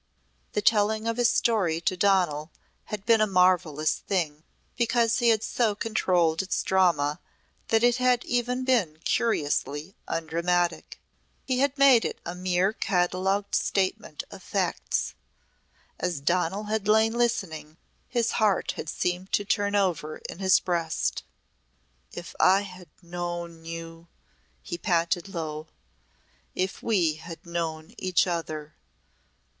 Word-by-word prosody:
The 210 - -1
telling 215 +1 +3
of 230 0 -1
his 245 -1 +4
story 190 -9 +1
to 185 - 0
Donal 180 -6 +2 0.4
had 210 -1 -6
been 225 -2 +4
a 215 - +4
marvellous 180 -5 +2
thing 155 -6 -2 0.3
because 235 -1 +2
he 240 -1 +4
had 220 -1 +3
so 225 -4 0
controlled 180 -7 +1
its 190 - -2
drama 170 -5 +2 0.5
that 225 0 +2
it 245 0 +4
had 250 -1 +2
even 245 +1 -1
been 210 -12 +1
curiously 150 -5 0
undramatic. 170 +2 -1 0.5
He 255 -1 0
had 280 +1 +1
made 275 -4 +6
it - - -3
a 175 - -4
mere 185 +2 +1
catalogued 190 +1 0
statement 190 -5 -1
of - - -10
facts. - - -1 0.9
As 175 -5 -1
Donal 180 +6 0
had 215 -1 -2
lain 220 +1 +4
listening 185 -10 -2 0.3
his 235 -2 0
heart 210 -4 +1
had 160 - -6
seemed 180 +3 -2
to 205 - +2
turn 205 0 0
over 165 -6 0
in - - -9
his 190 -1 +5
breast. 170 -3 -1 0.9
"If - - -8
I 190 +2 +5
had 185 -3 -10
known 170 -1 -5
you!" 165 0 -8 0.6
he 170 - -5
panted 175 0 0
low. 155 -3 -5 0.9
"If 185 +1 -2
we 175 -9 +1
had 165 +2 -10
known 165 -2 -4
each 185 -1 +2
other! 155 -4 -4
185 Hz, 130 wpm, -26 LUFS, 165-215 Hz, 0.9 s, made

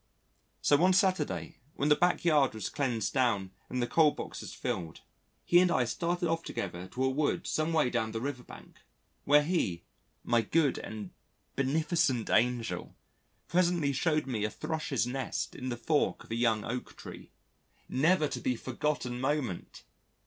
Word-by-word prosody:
So 145 - +5
one 180 +4 +4
Saturday, 185 -4 +1 0.2
when 145 - 0
the 150 - +7
backyard 155 -6 +3
was 110 - -3
cleaned 125 -7 -1
down 115 -8 +1 0.2
and 125 -1 -1
the - - -1
coal 160 +2 +5
boxes - - -7
filled, 85 -4 -4 0.4
he 175 - +6
and 180 0 +4
I 125 -7 +2
started 175 +7 -1
off 165 0 0
together 90 - -5
to 125 +8 -3
a 130 - +3
wood 145 +2 0
some 155 +1 0
way 155 -6 +2
down 110 0 -1
the 115 - -3
river 130 +1 -4
bank, - - -14 0.5
where 145 +1 +6
he 120 - -1 0.4
my 120 -1 +3
good 145 +2 +1
and 105 -4 -7 0.4
beneficent 140 -3 +1
angel 120 +1 0 0.5
presently 175 -5 +2
showed 155 +2 +1
me 120 -6 -2
a 110 - +1
Thrush's 155 -2 -2
nest 130 +2 -3
in 130 - -5
the 120 - -3
fork 150 +4 0
of - - -15
a - - 0
young 115 -2 +1
Oak 125 +2 -5
tree. - - -10 0.6
Never 155 +4 +3
to - - -4
be 125 - 0
forgotten 125 0 -2
moment! 130 - -2
135 Hz, 165 wpm, -30 LUFS, 120-155 Hz, 0.6 s, the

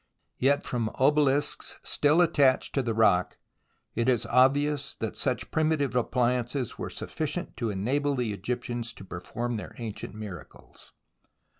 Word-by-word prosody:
Yet 140 +3 +3
from 115 -3 -1
obelisks 145 +1 +2
still 150 +4 +4
attached 145 -6 +3
to 135 - +2
the 115 -3 -2
rock, 90 -5 +3 0.6
it 115 +2 +1
is 120 -3 +2
obvious 140 +3 +2
that 110 -2 -4
such 125 -3 -1
primitive 155 -4 +1
appliances 125 +1 0
were - - -3
sufficient - - -4
to 115 - -1
enable 135 +9 0
the 120 -5 -1
Egyptians 120 +2 -3
to 95 - -11
perform 115 +7 -4
their 105 - -8
ancient 110 -3 -6
miracles. 100 -7 -10
125 Hz, 135 wpm, -28 LUFS, 115-140 Hz, 0.6 s, still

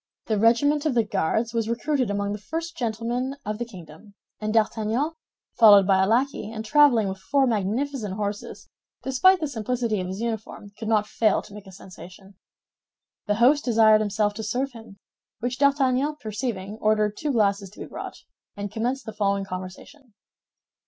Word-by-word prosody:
The 215 -2 0
regiment 285 +7 +3
of 275 - -1
the 230 - +4
Guards 220 +2 -1
was 230 -1 -1
recruited 255 0 0
among 200 0 -1
the 210 - -4
first 330 +9 -5
gentlemen 240 +3 -2
of 210 +1 -4
the 240 - -2
kingdom; 185 -1 -14 0.2
and 215 0 -2
D'Artagnan, 225 +6 0 0.5
followed 205 -4 +8
by 190 0 +3
a 190 - +2
lackey, 240 0 0
and 220 -1 -6
traveling 275 -5 +4
with 190 0 -5
four 275 +7 +1
magnificent 225 0 -1
horses, 205 0 -5 0.4
despite 360 +9 +4
the 310 - -2
simplicity 235 -4 -2
of 180 - -4
his 190 +2 -5
uniform, 220 -3 -5
could 220 - -7
not 215 -2 +2
fail 215 -1 +1
to - - -14
make 205 -1 -11
a - - -11
sensation. 185 +1 -13 0.9
The 205 - +1
host 265 +6 +4
desired 220 -3 +5
himself 210 0 0
to 220 +1 -6
serve 255 +6 -2
him; 225 -4 -13 0.4
which 245 +2 -3
D'Artagnan 280 0 +2
perceiving, 215 -2 -5
ordered 215 -1 +2
two 295 +5 -2
glasses 200 -4 +1
to 205 - -17
be - - -5
brought, - - -9 0.3
and 205 -1 -5
commenced 245 +4 -2
the 220 - -7
following 200 -2 0
conversation. 195 +8 -9
220 Hz, 170 wpm, -24 LUFS, 205-250 Hz, 0.9 s, followed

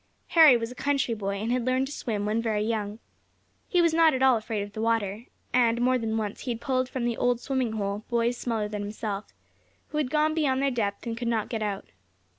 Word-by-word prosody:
Harry 315 -7 +8
was 230 0 -4
a - - -7
country 275 -2 0
boy, 200 -2 -3
and 215 +4 -2
had 250 -1 +1
learned 255 +2 +1
to 280 - -7
swim 210 -7 -3
when 215 +2 0
very 215 -2 0
young. 215 -2 -2 0.7
He 355 -2 +3
was 335 -1 +3
not 325 -3 +5
at 260 - 0
all 260 -2 +6
afraid 215 -2 -2
of 205 0 -10
the 215 - -4
water, 225 -1 0 0.3
and, 235 -2 +3
more 255 +1 +2
than 225 -1 -1
once, 210 -2 -3
he 260 - -5
had 225 - -8
pulled 255 0 0
from 255 -3 -3
"the 235 -1 -1
old 245 -1 +1
swimming 255 -3 -1
hole," 205 -1 -3
boys 235 0 +1
smaller 225 -3 -2
than 210 -1 -4
himself, 205 0 -5 0.6
who 300 - -2
had 285 -4 0
gone 310 +2 +2
beyond 285 -5 +1
their 275 0 +1
depth, 205 -4 -2
and 230 -1 -3
could 235 +1 -4
not 225 -2 0
get 225 -3 -3
out. 205 -2 -3
230 Hz, 235 wpm, -27 LUFS, 215-255 Hz, 0.7 s, Harry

